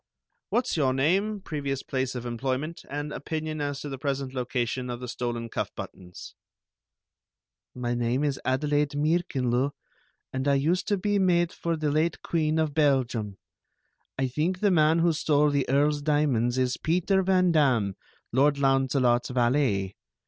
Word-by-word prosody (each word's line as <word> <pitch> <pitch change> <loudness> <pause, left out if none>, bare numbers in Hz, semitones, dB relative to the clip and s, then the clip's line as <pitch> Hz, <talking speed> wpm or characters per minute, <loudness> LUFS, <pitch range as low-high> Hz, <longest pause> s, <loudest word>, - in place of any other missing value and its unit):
"What's 240 -7 0
your 130 -4 +2
name, 195 +9 +1
previous 140 -6 -3
place 130 -1 -2
of 125 -1 -5
employment, 130 +7 -3
and 145 +1 -4
opinion 155 0 -4
as 145 -1 -3
to 145 - -5
the 135 -2 -6
present 135 -2 -2
location 125 0 -2
of 120 -1 -4
the 125 - -6
stolen 120 -1 -3
cuff - - -3
buttons?" 90 -1 -9 1.4
"My 120 -1 -2
name 120 +3 0
is 140 -2 -1
Adelaide 145 +2 0
Meerckenloo, 140 -5 +1 0.6
and 130 +1 -2
I 140 - +4
used 165 +7 +1
to 205 - +1
be 205 +2 0
maid 175 -2 +3
to 170 -1 0
the 155 -1 0
late 155 +3 +1
Queen 155 -2 0
of 155 -2 0
Belgium. 130 -9 +1 0.8
I 135 -1 +1
think 160 +8 -1
the 205 -2 +3
man 160 -1 +4
who 170 0 +3
stole 150 -1 +2
the 140 -3 0
Earl's 145 +2 +2
diamonds 140 -5 +1
is 130 -1 +1
Peter 180 +4 +1
Van 185 -1 +3
Damm, 125 - +2 0.4
Lord 140 +3 +3
Launcelot's 135 -3 +2
valet. 120 -6 +1
140 Hz, 155 wpm, -27 LUFS, 125-155 Hz, 1.4 s, I